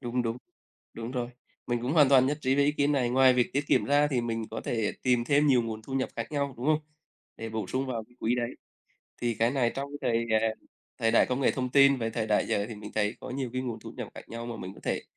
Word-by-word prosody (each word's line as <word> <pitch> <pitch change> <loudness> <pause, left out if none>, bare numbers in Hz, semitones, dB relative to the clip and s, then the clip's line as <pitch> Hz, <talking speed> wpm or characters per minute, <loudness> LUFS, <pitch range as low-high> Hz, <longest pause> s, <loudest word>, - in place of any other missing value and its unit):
Đúng, 125 0 -1
đúng, 115 0 -2 0.6
đúng 115 +1 -5
rồi, 125 -1 -3 0.4
mình 120 -1 -1
cũng 130 +4 -1
hoàn 145 -5 +6
toàn 130 -2 +6
nhất 145 +2 -1
trí 130 -1 +2
với 140 0 +3
ý 145 - +3
kiến 145 0 +1
này. 125 -4 +1
Ngoài 130 0 +5
việc 125 -1 +1
tiết 140 +2 0
kiệm - - +3
ra 145 +1 +4
thì 130 -4 0
mình 115 -1 -2
có 110 - -4
thể 110 -3 -1
tìm 125 -2 +2
thêm 145 +3 +3
nhiều 125 -4 +4
nguồn 110 -1 -5
thu 135 - -10
nhập 130 - 0
khác - - -4
nhau, 140 -2 -1
đúng 125 +4 -4
không? 155 0 +4 0.6
Để 115 - -5
bổ 110 -1 -3
sung 130 +1 -2
vào 115 -4 -3
cái 120 +2 -26
quỹ 120 +2 +1
đấy. 120 -1 -1 0.7
Thì 120 -1 +1
cái 115 +3 +2
này 125 -3 +1
trong 140 +1 -4
thời, 115 -3 0
à, 115 - +2 0.5
thời 115 0 +2
đại 115 - +5
công 130 +2 -1
nghệ - - +4
thông 125 -1 -2
tin, 140 0 +6
về 115 -2 -2
thời 110 -1 -2
đại 105 - +2
giờ, 100 +1 0
thì 115 - -6
mình 105 0 -9
thấy 105 +1 0
có - - -7
nhiều 130 -1 -3
cái 130 0 -2
nguồn 120 -3 -4
thu - - -9
nhập - - -5
khác - - -11
nhau 115 +1 -6
mà 120 - -5
mình 95 +1 -7
có - - -14
thể, - - -1
125 Hz, 280 wpm, -28 LUFS, 115-135 Hz, 0.7 s, hoàn